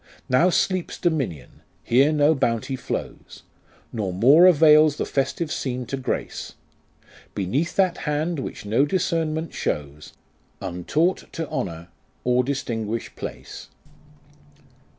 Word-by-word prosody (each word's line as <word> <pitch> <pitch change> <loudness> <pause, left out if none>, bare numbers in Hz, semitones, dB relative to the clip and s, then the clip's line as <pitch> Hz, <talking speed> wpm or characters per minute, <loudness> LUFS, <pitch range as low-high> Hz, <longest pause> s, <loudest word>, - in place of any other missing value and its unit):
Now 145 +8 +4
sleeps 185 0 0
Dominion; 135 - -2 0.2
here 135 +5 +4
no 150 0 +4
Bounty 125 -1 -1
flows, - - -6 0.5
Nor 105 -5 -2
more 135 - +6
avails 155 -3 +6
the - - -2
festive 150 +4 -2
scene 125 -2 -3
to 135 - -4
grace, 130 -1 -4 0.8
Beneath 130 - -1
that 185 -3 +2
hand 155 +2 -1
which 130 - -6
no 110 +6 +2
discernment 160 -1 -1
shows, 75 0 -4 0.5
Untaught 150 - -1
to 165 -2 -4
honour, 85 -2 -4 0.3
or 125 0 +2
distinguish 115 -4 -3
place. - - -8
140 Hz, 110 wpm, -23 LUFS, 115-160 Hz, 0.8 s, more